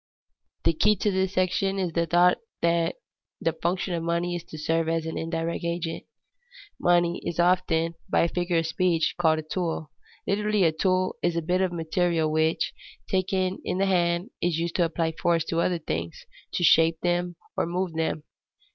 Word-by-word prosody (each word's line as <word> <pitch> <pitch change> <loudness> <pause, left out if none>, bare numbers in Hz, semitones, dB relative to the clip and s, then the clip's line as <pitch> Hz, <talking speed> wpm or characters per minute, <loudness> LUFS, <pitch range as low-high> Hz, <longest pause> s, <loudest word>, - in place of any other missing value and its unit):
_ - - -49
The 165 - +3
key 210 +7 +3
to 210 +2 0
this 190 0 0
section 190 +1 +1
is 180 -4 -1
the 170 0 +1
thought 175 +2 +4 0.2
that 170 0 +2 0.4
the - - 0
function 180 +1 -1
of 170 - -1
money 170 +1 -1
is 170 - -5
to 155 - -10
serve 165 +1 0
as 165 -1 0
an 160 - -4
indirect 165 +1 -3
agent. 170 -1 -3 0.7
Money 175 0 +2
is 170 - -4
often, 175 -2 +2 0.2
by - - +3
a 170 - +3
figure 175 0 -1
of 165 - +1
speech, 165 0 +1
called 160 -2 +4
a - - -2
tool. 160 -2 -3 0.3
Literally 210 0 +1
a 165 - +4
tool 185 +3 0
is 175 -1 +1
a 170 - 0
bit 180 +3 +1
of 185 -2 +1
material 165 -1 0
which, 160 +1 +1 0.3
taken 185 0 0
in - - -2
the 195 - +2
hand, 175 +1 +1
is 175 -2 +1
used 170 0 -2
to 175 - +4
apply 165 0 -1
force 165 0 +1
to 165 +1 0
other 175 0 +1
things, 85 - -5 0.3
to - - 0
shape 165 0 +5
them 175 0 0 0.2
or - - 0
move 180 0 -2
them. 160 -1 -1
170 Hz, 190 wpm, -26 LUFS, 165-180 Hz, 0.7 s, shape